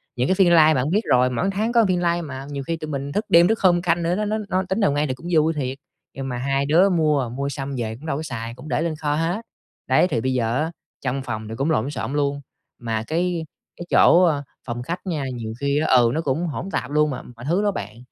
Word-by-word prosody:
những 125 +1 0
cái 185 - +2
phiên 185 -3 +4
live 160 -2 +6
bạn 135 +1 0
biết 200 +6 +2
rồi, 125 0 +4
mỗi 155 +11 -1
tháng 215 +4 -1
có 235 -2 +4
phiên 180 -1 +1
live 170 0 +1
mà 135 -4 -7
nhiều 140 -1 -4
khi 165 - -1
tụi 155 -1 -7
mình 140 -1 -4
thức 210 +6 -1
đêm 170 +1 +6
thức 225 +2 +1
hôm 175 -2 +4
canh 170 -1 +1
nữa, 170 +2 +1
nó 210 +2 -1
nó 215 +1 -1
nó 185 0 +1
tính 190 +4 0
nào 200 -9 +3
ngay 145 +1 0
thì 130 - -1
cũng 165 +7 -10
vui 160 0 +3
thiệt. 135 -3 -3 0.4
Nhưng 135 0 -5
mà 125 - -3
hai 135 +2 0
đứa 170 +7 +4
mua, 150 -8 +1
mua 140 +3 -3
xong 140 -1 -5
về 110 -2 -3
cũng 140 +7 -13
đâu 140 -3 -1
có 160 - -4
xài, 115 -5 -5
cũng 155 - -11
để 160 - 0
lên 165 -2 -1
kho 150 -1 -1
hết. 170 +7 -1 0.5
Đấy, - - +4
thì 115 - -1
bây 130 +2 0
giờ 120 -1 0
á 160 - -2 0.3
trong 135 +1 -2
phòng 110 -3 -5
thì 115 - -5
cũng 140 +5 0
lộn 135 -4 +1
xộn 135 0 -4
luôn 140 -1 0 0.4
mà 115 -2 -2
cái 170 0 -1 0.3
cái 175 - -7
chỗ, 180 +2 +6
ơ, 145 -5 +2 0.2
phòng 120 0 -4
khách 170 +7 -4
nha, 160 -6 -2
nhiều 110 -2 -5
khi 140 +1 +1
ừ, 125 -6 +4
nó 160 - 0
cũng 160 +3 -1
hỗn 165 +5 -4
tạp 130 +3 -3
luôn 150 0 +3
mà 135 - -4
mọi 120 0 -12
thứ 175 +7 +1
đó 205 - +2
bạn. 105 - -6
150 Hz, 275 wpm, -22 LUFS, 130-170 Hz, 0.5 s, live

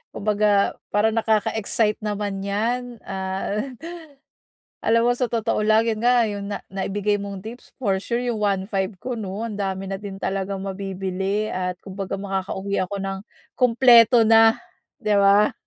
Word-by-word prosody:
kumbaga 205 -1 +2 0.2
parang 215 +2 +2
nakaka-excite 220 -1 +1
naman 205 -2 -3
'yan. 240 +4 -1
Ah, 190 +2 -3 1.2
alam 230 +1 +3
mo 245 - +4
sa 245 0 -1
totoo 225 -2 0
lang, 215 +1 +4
'yan 220 -2 -1
nga, 240 0 +4
'yong 205 -1 -4
na 205 - -5
naibigay 200 +1 -1
mong 200 -1 -7
tips 235 +3 -11
for 195 -7 0
sure 235 +4 -2
'yong 235 -3 -2
1,500 195 -1 -1
ko, 255 +7 -5
'no, 210 -1 -4
ang 210 -3 -5
dami 195 0 -2
na 195 0 -5
din 200 -2 -7
talagang 195 0 -3
mabibili 195 +1 -3
at 180 0 -2
kumbaga 195 0 -5
makakauwi 195 0 -3
ako 190 +2 -3
nang 195 0 -4 0.3
kumpleto 240 -1 +6
na, 225 0 +6 0.4
'di 215 -6 -1
ba? 200 +1 +5
205 Hz, 150 wpm, -23 LUFS, 195-225 Hz, 1.2 s, kumpleto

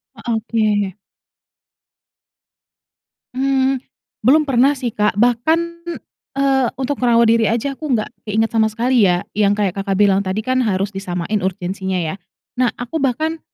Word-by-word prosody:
Eee, 235 0 -4
oke. 215 -4 0 2.4
Mmm. 265 0 +1 0.4
Belum 300 +6 +5
pernah 270 +2 +3
sih, 250 -3 -3
Kak. 210 -1 0
Bahkan, 245 +9 +2 0.8
eee, 270 -2 +2
untuk 270 +1 -2
ngerawat 235 -2 +4
diri 230 -1 +3
aja, 235 +5 -1
aku 305 0 -5
nggak 215 - -2 0.2
keinget 220 +2 +1
sama 220 -1 +3
sekali 240 +1 +2
ya 180 0 +1
yang 205 -1 +3
kayak, 200 -3 -1
Kakak 195 0 -2
bilang 200 -1 +4
tadi 190 +2 -2
kan 255 +1 0
harus 195 -2 -1
disamain 190 +1 -3
urgensinya 190 +1 -2
ya? 160 +1 -2 0.4
Nah, 250 -1 +3
aku 245 +6 -4
bahkan 310 +5 -1
230 Hz, 140 wpm, -19 LUFS, 200-260 Hz, 2.4 s, Belum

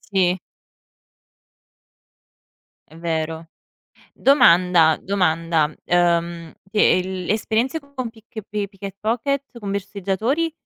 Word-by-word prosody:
Sì. 185 -2 +1 2.5
È 160 - -14
vero. 160 -1 -3 0.6
Domanda 175 - +5
domanda: 165 -5 +1
ehm, 170 -1 +1 0.2
e 205 -3 +4
l 185 0 -5
l' - - -4
esperienze 225 +7 0
con 280 -4 -6
Pick 225 0 -23
e 220 - -4
pi 205 -1 -3
Picket 195 -1 -9
Pocket, 250 +4 -2
con 205 -3 -5
borseggiatori? 200 - -1
195 Hz, 100 wpm, -21 LUFS, 170-225 Hz, 2.5 s, Domanda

